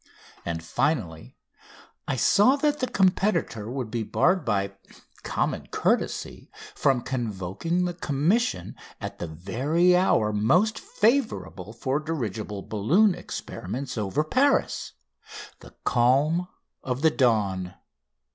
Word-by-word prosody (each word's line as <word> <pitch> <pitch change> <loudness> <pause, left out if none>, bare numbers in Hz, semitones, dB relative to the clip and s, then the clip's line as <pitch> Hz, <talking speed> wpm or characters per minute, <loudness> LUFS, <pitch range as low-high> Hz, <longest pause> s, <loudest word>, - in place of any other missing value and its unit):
And, 80 -1 -4
finally, 85 - -2 0.7
I - - 0
saw 205 - +4
that 295 +1 0
the 255 - 0
competitor 180 - +1
would 125 -3 -4
be 120 -1 -1
barred 180 - +2
by 100 -2 -1 0.5
common - - -2
courtesy - - -1 0.2
from 130 -3 +2
convoking 120 - -2
the 175 - -2
Commission 165 - 0 0.2
at - - -7
the 85 - -4
very 140 - +1
hour 110 - +2
most 180 - +2
favourable 110 - 0
for 130 +5 -1
dirigible 110 -10 -4
balloon 165 - +3
experiments 130 - -6
over 110 +7 0
Paris 265 - +1 0.7
the - - -15
calm 145 +9 +2 0.3
of 130 +2 -3
the 160 - +5
dawn. 100 -9 +1
130 Hz, 110 wpm, -26 LUFS, -, 0.7 s, the